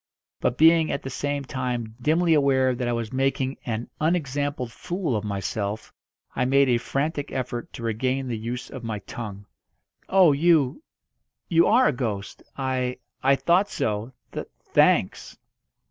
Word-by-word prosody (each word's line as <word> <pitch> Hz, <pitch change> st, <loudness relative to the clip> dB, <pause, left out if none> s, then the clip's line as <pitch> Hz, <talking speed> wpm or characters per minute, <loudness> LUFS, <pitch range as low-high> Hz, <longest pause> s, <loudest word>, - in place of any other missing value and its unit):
But 125 Hz, -, 0 dB
being 160 Hz, 0 st, +5 dB
at -, -, -3 dB
the 135 Hz, -, -5 dB
same 145 Hz, +1 st, -2 dB
time 125 Hz, -4 st, -3 dB
dimly 165 Hz, +4 st, +3 dB
aware 135 Hz, -3 st, +3 dB
that 125 Hz, 0 st, -3 dB
I -, -, +1 dB
was 115 Hz, -1 st, -3 dB
making 135 Hz, 0 st, 0 dB
an 115 Hz, 0 st, -2 dB
unexampled 145 Hz, -5 st, -1 dB
fool 175 Hz, -, -3 dB
of 105 Hz, -, -2 dB
myself, 100 Hz, +1 st, -3 dB, 0.4 s
I -, -, +1 dB
made 135 Hz, +1 st, +4 dB
a 120 Hz, -1 st, +3 dB
frantic 145 Hz, +3 st, -2 dB
effort 125 Hz, -2 st, -4 dB
to 115 Hz, -, -8 dB
regain 130 Hz, +4 st, -1 dB
the 120 Hz, -, -2 dB
use 120 Hz, +3 st, -5 dB
of 130 Hz, -3 st, -8 dB
my 110 Hz, -2 st, -3 dB
tongue. 100 Hz, -1 st, -8 dB, 0.6 s
"Oh, 190 Hz, -4 st, +6 dB
you 155 Hz, -, +3 dB, 0.7 s
you 170 Hz, 0 st, +5 dB
are 250 Hz, +4 st, +5 dB
a -, -, 0 dB
ghost! 110 Hz, -6 st, -4 dB, 0.2 s
I 130 Hz, -2 st, -1 dB, 0.2 s
I 135 Hz, +1 st, +4 dB
thought 180 Hz, +7 st, +2 dB
so. 105 Hz, +3 st, -2 dB, 0.2 s
Tha -, -, -5 dB, 0.3 s
thanks." -, -, +2 dB
130 Hz, 155 wpm, -25 LUFS, 115-145 Hz, 0.7 s, Oh